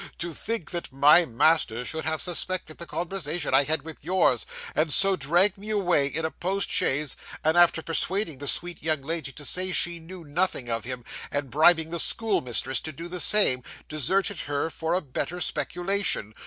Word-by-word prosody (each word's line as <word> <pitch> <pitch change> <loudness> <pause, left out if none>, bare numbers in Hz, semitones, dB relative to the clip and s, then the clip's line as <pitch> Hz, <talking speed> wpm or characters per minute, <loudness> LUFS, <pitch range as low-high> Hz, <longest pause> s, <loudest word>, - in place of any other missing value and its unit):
'To 170 0 -4
think 225 0 -3
that 175 -4 -5
my 145 +6 +5
master 125 -2 +1
should 160 +4 -3
have 160 0 -2
suspected 180 -2 -2
the 170 - -8
conversation 170 -4 -3
I 135 +1 +5
had 160 +2 -1
with 160 -2 -9
yours, 170 -8 +1 0.3
and 155 0 0
so 195 +5 +6
dragged 180 +6 +1
me 210 +2 -8
away 180 -9 +1
in 160 +3 -1
a 160 - -3
post 195 +3 -3
chaise, 150 -7 +2 0.3
and 160 +2 +1
after 175 -2 +3
persuading 165 -2 -1
the 145 - -3
sweet 175 +5 -1
young 155 -3 0
lady 155 -2 -2
to 145 - -9
say 185 +5 +1
she 175 -1 -1
knew 175 +2 -11
nothing 145 -5 -1
of 115 0 -2
him, 125 -2 -5 0.2
and 145 -3 -4
bribing 160 +3 +4
the 170 - -1
school 225 +4 +1
mistress 130 +1 0
to 155 - -6
do 165 +4 -7
the 180 +1 -3
same, 175 -9 +5 0.3
deserted 185 +6 -1
her 145 +3 -3
for 165 +2 -3
a 185 - 0
better 155 +4 -5
speculation! 180 - 0
165 Hz, 190 wpm, -25 LUFS, 145-180 Hz, 0.3 s, so